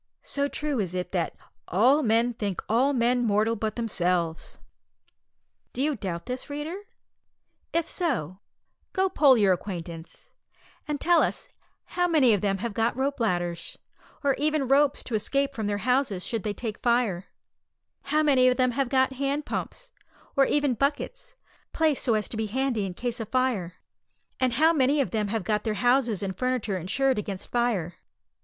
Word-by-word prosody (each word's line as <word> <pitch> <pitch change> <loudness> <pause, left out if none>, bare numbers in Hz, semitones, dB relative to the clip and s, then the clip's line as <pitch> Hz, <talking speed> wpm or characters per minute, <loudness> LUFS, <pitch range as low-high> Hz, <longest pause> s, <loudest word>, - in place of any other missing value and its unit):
So 280 0 -1
true 290 -2 -2
is 185 -3 -2
it 180 0 -3
that, 175 -3 -1 0.3
"all 250 - +4
men 235 -1 +2
think 205 -5 -3
all 250 +6 +3
men 245 -1 +2
mortal 215 +1 +2
but 215 0 -3
themselves!" 180 -7 -1 1.2
Do 255 - -3
you 300 0 +1
doubt 180 -5 -5
this, 250 +3 -5
reader? 295 +4 -4 1.0
If 335 -1 +1
so, 200 - -1 0.5
go 380 -1 +2
poll 280 -7 +5
your 200 -4 +4
acquaintance, 170 -3 -7 0.6
and 295 -1 -2
tell 345 +1 +4
us - - -2 0.4
how 355 0 0
many 290 -9 +4
of 200 - +1
them 195 -1 0
have 230 - -3
got 230 +3 0
rope 275 +1 -1
ladders, 175 -6 -1 0.5
or 280 -1 +3
even 300 -2 +1
ropes, 280 +2 +3
to 245 - -8
escape 275 +6 0
from 220 -5 -3
their 205 0 0
houses 250 -7 +1
should 230 -3 -2
they 205 +2 -2
take 220 -3 -5
fire; 235 -7 +1 0.8
how 305 +2 +2
many 265 -4 +4
of 250 - +3
them 255 -1 +3
have 265 +1 -1
got 260 0 +2
hand 275 +2 -2
pumps, - - -5 0.4
or 275 -1 +5
even 290 -2 +1
buckets, 300 - -2 0.4
placed 315 -4 +1
so 230 - +2
as 210 -2 0
to 225 - -5
be 220 0 -1
handy 240 -3 -1
in 180 - -7
case 245 +2 -3
of 225 - -5
fire; 240 -9 0 0.6
and 255 -2 +1
how 315 +6 +4
many 285 0 +2
of 275 - 0
them 215 -2 0
have 215 0 -2
got 210 +2 0
their 220 -2 -1
houses 245 -4 +2
and 190 -2 -4
furniture 255 -5 -1
insured 260 +8 +1
against 195 -2 -6
fire. 220 -9 0
245 Hz, 175 wpm, -26 LUFS, 205-275 Hz, 1.2 s, poll